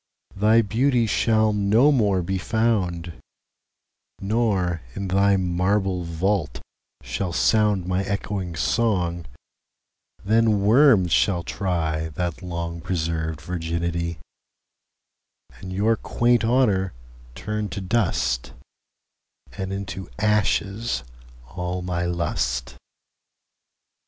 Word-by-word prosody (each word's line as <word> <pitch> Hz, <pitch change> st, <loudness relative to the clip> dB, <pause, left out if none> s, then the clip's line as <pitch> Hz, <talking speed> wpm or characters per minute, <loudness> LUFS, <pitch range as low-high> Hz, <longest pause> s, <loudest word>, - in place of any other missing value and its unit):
Thy 110 Hz, +3 st, +4 dB
Beauty 120 Hz, +3 st, +2 dB
shall 110 Hz, 0 st, +2 dB
no 105 Hz, +8 st, +4 dB
more 100 Hz, -9 st, +2 dB
be 95 Hz, +2 st, -2 dB
found; 95 Hz, -6 st, 0 dB, 1.1 s
Nor, 95 Hz, -5 st, 0 dB
in 100 Hz, -1 st, -4 dB
thy 100 Hz, +1 st, +3 dB
marble 95 Hz, +1 st, 0 dB
Vault, 85 Hz, -3 st, -1 dB, 0.4 s
shall 65 Hz, +10 st, -3 dB
soundMy 95 Hz, -1 st, +2 dB
ecchoing 95 Hz, -3 st, -3 dB
Song: 90 Hz, -4 st, 0 dB, 1.0 s
then 110 Hz, -1 st, +3 dB
Worms 110 Hz, -, +5 dB
shall 90 Hz, -1 st, +2 dB
tryThat 85 Hz, -2 st, -2 dB
long 85 Hz, -2 st, -5 dB
preserv'd 80 Hz, -3 st, -2 dB
Virginity:And 85 Hz, +2 st, -7 dB
your 105 Hz, +4 st, +2 dB
quaint 120 Hz, +1 st, +1 dB
Honour 105 Hz, -6 st, +2 dB, 0.4 s
turn 105 Hz, -1 st, -3 dB
to 90 Hz, -, -5 dB
dust; 90 Hz, -, 0 dB, 1.0 s
And 95 Hz, 0 st, -4 dB
into 95 Hz, -1 st, -5 dB
ashes 105 Hz, -, 0 dB, 0.4 s
all 90 Hz, +5 st, -4 dB
my 90 Hz, -1 st, -2 dB
Lust. 65 Hz, -8 st, -2 dB
95 Hz, 85 wpm, -23 LUFS, 85-105 Hz, 1.1 s, Worms